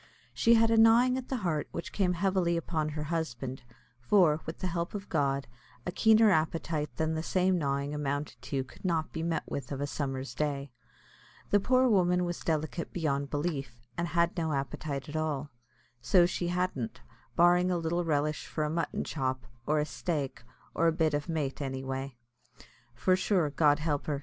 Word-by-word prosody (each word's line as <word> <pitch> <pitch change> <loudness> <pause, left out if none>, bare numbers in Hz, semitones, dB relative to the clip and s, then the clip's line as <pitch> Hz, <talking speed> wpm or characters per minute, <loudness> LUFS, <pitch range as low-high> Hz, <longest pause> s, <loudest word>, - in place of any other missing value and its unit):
She 235 0 +5
had 225 0 +4
a 225 - +4
gnawing 230 +3 +6
at 260 -1 -5
the 265 - -1
heart 155 -4 0
which 170 - -5
came 185 -3 +2
heavily 180 -2 +1
upon 160 -2 -1
her 150 0 -4
husband; 135 -5 -3 0.4
for, 155 +3 +4
with 160 - -5
the - - -4
help 170 +1 -2
of 200 -1 -6
God, 140 -3 +1 0.4
a 180 - -2
keener 220 +2 +5
appetite 155 -2 0
than 160 0 0
the 160 - -1
same 185 +1 +2
gnawing 140 -1 -1
amounted 145 0 -3
to 135 -2 -2
could 130 - -17
not 165 -4 0
be 160 - -3
met 165 0 -1
with 140 -1 -5
of 135 - -3
a 145 - 0
summer's 135 -2 -3
day. 140 -2 -2 0.8
The 205 - +5
poor 255 +5 +3
woman 180 -5 +3
was 175 0 -3
delicate 160 +1 -2
beyond 140 -5 -1
belief, 140 -5 -3 0.2
and 170 - -1
had 170 0 +1
no 160 -3 -1
appetite 140 0 -3
at 150 - -7
all, 150 -3 -2 0.5
so 175 +8 +5
she 175 0 -2
hadn't, 175 -9 -2 0.3
barring 175 +1 +5
a 180 - +1
little 170 +1 -1
relish 150 -1 0
for 155 - -2
a 150 - -1
mutton 170 +1 -1
chop, 130 -4 -2 0.2
or 150 0 +3
a 150 - +1
"staik," 145 -7 -3 0.3
or 165 - +2
a - - +5
bit 160 -1 +1
o' 145 - +1
mait, 150 -5 -2
anyway; 135 -1 -4 0.8
for 185 +9 +3
sure, 185 -5 +1
God 145 -1 +4
help 150 -2 -2
her! 145 -2 -1
160 Hz, 185 wpm, -30 LUFS, 145-175 Hz, 0.8 s, gnawing